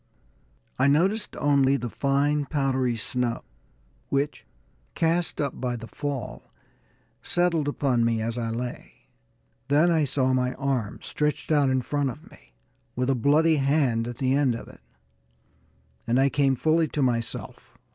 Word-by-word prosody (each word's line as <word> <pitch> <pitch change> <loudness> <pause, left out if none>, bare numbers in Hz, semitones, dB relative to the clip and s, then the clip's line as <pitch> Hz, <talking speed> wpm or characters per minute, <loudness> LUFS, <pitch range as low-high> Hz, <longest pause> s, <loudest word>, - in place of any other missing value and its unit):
I 130 - +4
noticed 190 +10 +1
only 140 -2 +3
the 120 - -4
fine, 140 +4 +1
powdery 130 -4 0
snow 120 +1 -2 0.7
which, 140 +2 -2 0.5
cast 165 +1 0
up 140 -2 -3
by 125 -1 -1
the 115 -1 -7
fall, 135 +1 -6 0.7
settled 170 -4 +1
upon 135 -4 +1
me 115 -1 +1
as 115 +1 -2
I 115 -2 -2
lay. 120 +2 -5 0.7
Then 150 +5 +4
I 160 -3 +3
saw 130 -1 0
my 125 0 0
arm, 130 -6 -2
stretched 150 +1 -2
out 145 -3 +4
in 130 -1 +1
front 145 0 -1
of 150 +5 -10
me, - - -20 0.4
with 125 +2 0
a - - +3
bloody 150 +6 +3
hand 135 -5 +1
at 120 -1 -6
the 130 -1 +1
end 135 -4 +2
of - - -8
it, - - -15 1.3
and 120 +2 +2
I 135 +1 +4
came 135 -1 +2
fully 160 +4 +2
to 145 -1 -1
myself. 115 -3 -3
135 Hz, 150 wpm, -25 LUFS, 125-145 Hz, 1.3 s, I